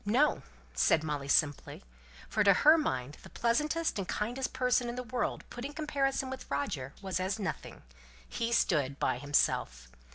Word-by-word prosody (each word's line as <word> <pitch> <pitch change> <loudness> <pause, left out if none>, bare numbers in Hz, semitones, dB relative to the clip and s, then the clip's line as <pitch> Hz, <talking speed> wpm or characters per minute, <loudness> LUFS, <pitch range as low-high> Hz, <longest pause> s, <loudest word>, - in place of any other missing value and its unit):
"No!" 250 +9 +2 0.3
said 65 - +3
Molly, 145 -3 -3
simply; 145 0 +1 0.4
for 210 0 +1
to 200 - +7
her 300 - +6
mind 135 - -2
the - - -13
pleasantest 300 +4 0
and 190 - -3
kindest 245 +5 -2
person 250 -1 +1
in 240 - -4
the 250 - -4
world 245 0 -2
put 240 - -7
in 285 +2 -5
comparison 280 -3 -1
with 265 - -8
Roger 140 -1 -3
was 190 -2 -2
as 190 +3 -1
nothing; 200 -3 -5 0.4
he 230 0 -3
stood 145 - +1
by 125 - 0
himself. 145 - 0
215 Hz, 165 wpm, -31 LUFS, -, 0.4 s, to